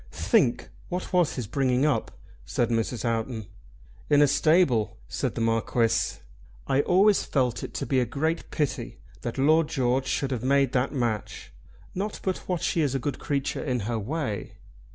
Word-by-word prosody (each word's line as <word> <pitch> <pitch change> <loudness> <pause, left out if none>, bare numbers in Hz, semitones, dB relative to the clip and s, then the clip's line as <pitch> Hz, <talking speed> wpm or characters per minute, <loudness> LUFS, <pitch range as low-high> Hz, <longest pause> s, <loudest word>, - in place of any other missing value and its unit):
"Think 105 - +1 0.2
what 180 +1 -4
was 180 -4 +3
his 125 - -3
bringing 130 +3 +1
up," 140 -7 +1 0.3
said 120 -1 -1
Mrs. 115 +1 -1
Houghton. 115 -1 -2 0.6
"In 145 0 +6
a - - +5
stable," 140 - +3
said - - -2
the - - -2
Marquis. 115 0 +1 0.5
"I 135 - +2
always 195 +6 +4
felt 125 -4 0
it - - -7
to - - -2
be 130 - +2
a 125 - +2
great 160 +7 -2
pity 130 -6 -2 0.2
that 120 - -4
Lord 155 +3 +4
George 130 -1 0
should 135 0 -1
have 125 -4 -2
made 135 0 +3
that 130 -1 +1
match; 115 - -3 0.4
not 200 +3 -3
but 190 -1 -1
what 180 -2 -1
she 165 - +1
is 140 -3 0
a - - +3
good 140 +3 -3
creature 140 -1 -2
in 125 -4 -1
her 115 +2 -2
way." 115 -2 -3
130 Hz, 175 wpm, -26 LUFS, 115-150 Hz, 0.6 s, In